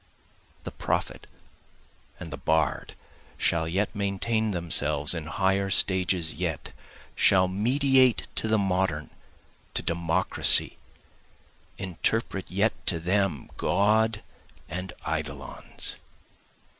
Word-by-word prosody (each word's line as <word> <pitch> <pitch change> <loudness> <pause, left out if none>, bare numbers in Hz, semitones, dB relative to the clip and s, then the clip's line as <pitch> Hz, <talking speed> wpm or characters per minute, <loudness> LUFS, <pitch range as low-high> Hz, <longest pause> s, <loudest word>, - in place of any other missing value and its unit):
The - - -6
prophet - - -3 0.9
and 80 -4 -8
the - - -5
bard, 80 +3 -1 0.4
Shall 80 -1 +1
yet 95 +5 -1
maintain 105 +3 -1
themselves, 75 -4 +2
in 80 -3 -5
higher 95 +4 0
stages 95 -3 +2
yet, - - -4 0.4
Shall 95 -1 +4
mediate 130 +5 +3
to - - -1
the 110 0 +2
Modern, 95 -6 -1 0.6
to - - -2
Democracy, 85 +2 +3 1.0
interpret 95 +2 -2
yet 100 +4 +1
to 85 - +1
them, 90 -3 -1
God 105 +3 +1 0.4
and 90 +1 -6 0.2
eidolons. 75 -4 -4
95 Hz, 95 wpm, -26 LUFS, 80-100 Hz, 1.0 s, Shall